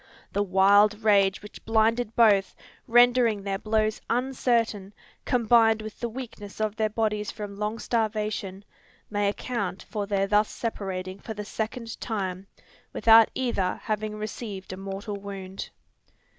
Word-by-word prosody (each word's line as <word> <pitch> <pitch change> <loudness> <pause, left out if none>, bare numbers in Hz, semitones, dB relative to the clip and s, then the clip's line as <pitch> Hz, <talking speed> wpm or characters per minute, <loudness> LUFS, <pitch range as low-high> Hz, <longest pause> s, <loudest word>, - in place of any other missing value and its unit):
The 200 - +1
wild 205 +2 +4
rage 200 -2 +3
which 210 - -12
blinded 225 +1 +1
both, 205 -4 +4 0.3
rendering 240 -3 +4
their 195 -1 -2
blows 215 0 0
uncertain, 235 -5 0 0.3
combined 225 -2 +3
with 215 -1 -9
the 235 - -2
weakness 225 -5 -9
of 215 -1 -1
their 220 -1 0
bodies 210 -1 -1
from 205 -2 -7
long 210 +2 -3
starvation, 215 -4 -2 0.5
may 205 -1 +1
account 200 -4 -3
for 205 0 -4
their 195 -1 +1
thus 210 +1 +2
separating 190 -4 -4
for 220 +2 -7
the 210 0 -6
second 225 +2 -5
time, 195 -4 -3 0.5
without 225 0 +6
either 235 -8 -1
having 215 0 -2
received 210 -3 -6
a - - -7
mortal 195 +2 -5
wound. 195 -1 -7
210 Hz, 135 wpm, -26 LUFS, 200-225 Hz, 0.5 s, without